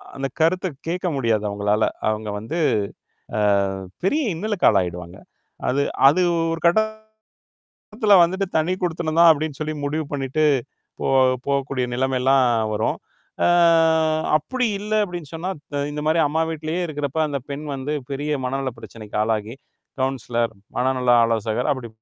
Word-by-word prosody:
அந்தக் 135 -1 -4
கருத்த 180 +4 +2 0.2
கேட்க 180 +2 -2
முடியாது 115 -5 +1
அவுங்களால. 105 +1 0 0.2
அவுங்க 110 0 -2
வந்து, 135 +11 -4 0.8
அ - - +1 0.6
பெரிய 290 +12 +2
இன்னலுக்கு 205 +3 0
ஆளாயிடுவாங்க. 90 0 -1 0.5
அது 135 +3 +1 0.3
அது 160 +6 +2 0.3
ஒரு 165 - -4 1.1
கட்டத்துல 210 -2 +1
வந்துட்டு, 190 +3 0
"தனிக்குடித்தனம் 170 -1 -1
தான்" 170 0 +8
அப்படின்னு 155 -2 -2
சொல்லி 155 0 -3
முடிவு 155 +2 -2
பண்ணிட்டு, 140 +2 0 0.6
போ - - -2 0.4
போகக்கூடிய 140 -2 0
நிலைமைல்லாம் 130 +1 +2 0.3
வரும். 105 - -1 0.5
அ - - +4 0.9
"அப்படி 250 - -2
இல்ல" 210 +1 -4
அப்படின்னு 175 -6 -8
சொன்னா, 175 +4 -3 0.2
த 140 0 -1
இந்த 150 0 -4
மாரி 160 +1 +3
அம்மா 160 +3 0
வீட்டிலயே 160 +2 -3
இருக்குறப்ப, 145 -1 -4
அந்தப் 140 -3 -5
பெண் 145 +2 -5
வந்து 140 +3 -3 0.2
பெரிய 145 +2 -3
மனநலப் 130 -1 -3
பிரச்சனைக்கு 110 -2 -8
ஆளாகி, 110 +1 -2 0.5
கவுன்சிலர், 120 -3 -2 0.2
மனநல 125 -1 +2
ஆலோசகர் 115 +4 0
அப்படி 130 -4 -8
140 Hz, 130 wpm, -22 LUFS, 120-165 Hz, 1.1 s, தான்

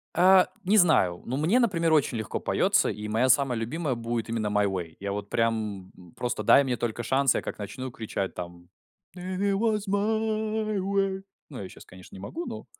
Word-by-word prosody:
Э, 185 +1 +6 0.2
не 200 +3 +3
знаю. 150 - +4
Ну, 130 - -3
мне, 170 - +3
например, 170 -9 +2
очень 140 -5 +2
легко 110 -3 -3
поётся, - - +2
и 105 0 -5
моя 115 +4 +2
самая 130 -2 +3
любимая 140 +4 -2
будет 115 0 -3
именно 115 -2 -1
"My 105 0 +2
Way". 90 -4 -5
Я 100 0 -4
вот 100 0 -5
прям, 110 -5 -1
п 90 - -17
просто 120 - -3
дай 140 - +6
мне 125 -3 -1
только 120 0 -3
шанс, 135 +1 +2
я - - 0
как - - -7
начну 130 +5 -6
кричать, 110 -4 -4
там: 85 -1 -9 0.5
"И - - -10
ит 190 +2 -1
воз 215 0 0
май 215 +1 0
уэй". 195 0 -1 0.3
Ну, 135 -7 -7
я 95 - -7
щас, - - -14
конечно, 90 0 -14
не - - -9
могу, 335 - -6
но - - -7
130 Hz, 200 wpm, -27 LUFS, -, 0.5 s, Э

